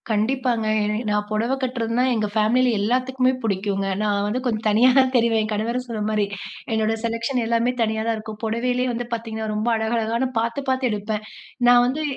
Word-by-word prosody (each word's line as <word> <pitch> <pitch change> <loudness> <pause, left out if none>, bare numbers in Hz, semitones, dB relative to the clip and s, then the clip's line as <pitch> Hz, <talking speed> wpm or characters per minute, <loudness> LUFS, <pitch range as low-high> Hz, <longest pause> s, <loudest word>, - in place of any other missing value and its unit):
கண்டிப்பாங்க. 230 +1 0 0.2
எ - - 0 0.2
நான் 210 0 0
புடவை 230 +5 0
கட்டுறதுனா 245 -2 0
எங்க 215 -2 0
ஃபேமிலியில 230 +2 +2
எல்லாத்துக்குமே 255 +3 +1
பிடிக்குங்க. 195 -1 -1
நான் 205 -1 +1
வந்து 225 +5 -1
கொஞ்சம் 225 -3 -1
தனியா 225 +5 +5
தான் 260 -1 +5
தெரிவேன். 230 -2 +3
என் 215 - -4
கணவரும் 235 +4 -2
சொன்ன 225 -3 -4
மாரி, 210 -1 +1 0.5
என்னோட 220 0 +1
செலெக்ஷன் 230 +3 -1
எல்லாமே 235 +1 +1
தனியா 220 -1 0
தான் 230 - +1
இருக்கும். 215 0 -8
புடவையிலேயே 245 +3 0
வந்து 240 +1 -3
பார்த்தீங்கன்னா 220 -1 -4
ரொம்ப 215 +2 -2
அழகழகான 230 +2 0
பார்த்து 230 +4 -1
பார்த்து 260 -1 +1
எடுப்பேன். 210 +1 -3 0.4
நான் 245 0 +7
வந்து 275 +5 -1
230 Hz, 175 wpm, -22 LUFS, 215-245 Hz, 0.5 s, நான்